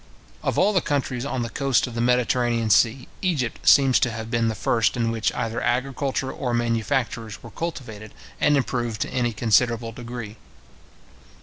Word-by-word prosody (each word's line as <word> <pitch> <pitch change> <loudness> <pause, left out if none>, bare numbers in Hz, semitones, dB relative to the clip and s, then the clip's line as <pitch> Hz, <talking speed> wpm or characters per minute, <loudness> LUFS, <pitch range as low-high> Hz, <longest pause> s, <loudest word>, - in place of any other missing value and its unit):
Of - - -1
all 205 +3 +3
the 185 - +3
countries 135 -4 -2
on 130 -3 -2
the 115 - -4
coast 135 -4 +1
of 125 - -8
the 115 - -2
Mediterranean 120 -2 +1
sea, 120 +4 +3
Egypt 150 -11 -1
seems 135 -2 +6
to 125 - +2
have 115 0 -6
been 115 -1 +1
the 110 - -1
first 110 +1 +1
in 115 -1 0
which 115 -2 0
either 115 -1 -2
agriculture 130 +1 -1
or 125 -2 -2
manufactures 115 -1 -1
were 115 - -10
cultivated 110 -9 -6 0.3
and 145 -1 +4
improved 120 -5 -2
to - - -1
any 120 -2 +1
considerable 115 +1 +1
degree. 115 -2 -8
120 Hz, 170 wpm, -24 LUFS, 115-130 Hz, 0.3 s, seems